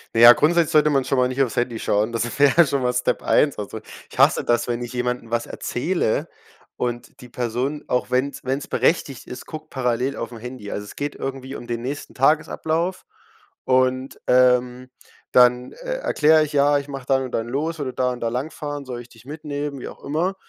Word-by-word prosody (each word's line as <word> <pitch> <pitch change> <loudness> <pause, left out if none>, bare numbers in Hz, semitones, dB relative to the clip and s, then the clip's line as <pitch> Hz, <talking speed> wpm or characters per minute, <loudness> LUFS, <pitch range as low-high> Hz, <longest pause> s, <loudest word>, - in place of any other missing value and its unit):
Na - - +2
ja, 120 +1 +11
grundsätzlich 170 +3 +2
sollte 150 -1 +5
man 135 -3 +1
schon 135 - 0
mal 125 0 +3
nicht 130 +2 -1
auf's 125 -5 0
Handy 120 -2 -1
schauen. 105 +3 +1
Das 120 +3 -2
wäre 145 +4 +5
schon 140 -1 0
mal 125 0 +1
Step 125 - 0
1. 145 -2 +3
Also, 105 +1 -5 0.3
ich - - -12
hasse - - +5
das, 120 0 +1
wenn 120 0 -2
ich 120 - -7
jemandem 125 -2 -3
was 120 0 0
erzähle 160 -2 -1 0.5
und 120 +2 -4
die 125 - -12
Person, 125 +5 -3
auch 125 - -1
wenn's 130 +2 -1
wenn's 135 +2 -2
berechtigt 140 -6 0
ist, 125 - -8
guckt 155 0 -9
parallel 125 +1 -1
auf 115 - -5
'n 115 - -8
Handy. 125 -3 -8
Also, 105 - -4
es 105 - -12
geht 145 0 -3
irgendwie 135 0 -5
um - - -8
den 120 -1 -4
nächsten 140 +4 -5
Tagesablauf 160 +5 0 0.6
und, 130 +1 +1
ähm, 125 0 +3 0.4
dann, 125 0 +4
äh, - - -5
erkläre 155 - +4
ich: 150 - -4
„Ja, 145 0 +4
ich 140 0 -5
mache 135 -2 -7
dann 135 -1 +2
und 130 - -6
dann 115 +1 -1
los, 155 +6 -2
würde 130 -3 -3
da 125 -1 0
und 125 - -6
da 115 - 0
lang 130 +6 -3
fahren, 145 -1 -5
soll 125 -2 -6
ich 120 - -14
dich 115 -1 -18
mitnehmen“, 145 -1 -5
wie - - -7
auch - - -12
immer, 170 +6 -1
130 Hz, 215 wpm, -22 LUFS, 120-145 Hz, 0.6 s, ja